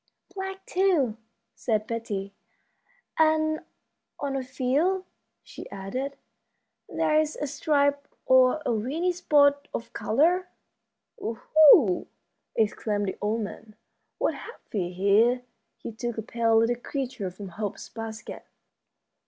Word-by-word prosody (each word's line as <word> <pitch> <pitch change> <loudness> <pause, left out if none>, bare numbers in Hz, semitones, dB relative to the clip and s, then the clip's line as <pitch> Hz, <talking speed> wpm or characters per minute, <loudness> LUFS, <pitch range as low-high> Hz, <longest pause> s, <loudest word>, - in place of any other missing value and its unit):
"Black, 385 0 -6
too," 340 - +2 0.4
said 215 -3 -1
Betty; 205 -4 -4 0.9
"and 315 0 +3 0.6
on 280 -1 -2
a 270 - -1
few," 290 +9 0 0.4
she - - -10
added, 255 +9 -5 0.7
"there's 310 0 +1
a 295 - -3
stripe 285 0 +1 0.2
or 260 +4 +5
a - - +1
weeny 285 +12 0
spot 285 -5 +3
of 230 0 -6
color." 345 +10 +2 0.7
"Oho!" 245 - +5 0.5
exclaimed 210 -2 0
the - - -6
old 215 +2 0
man, 215 +1 -8 0.4
"what - - +1
have 465 - -10
we 185 -5 -1
here?" 205 +7 +3 0.3
He - - -7
took 240 +1 -4
a 220 - -3
pale 230 0 +2
little 230 +2 +3
creature 250 -6 -4
from 190 +2 -9
Hope's 205 +3 -5
basket. 220 -1 -8
250 Hz, 115 wpm, -27 LUFS, 215-300 Hz, 0.9 s, or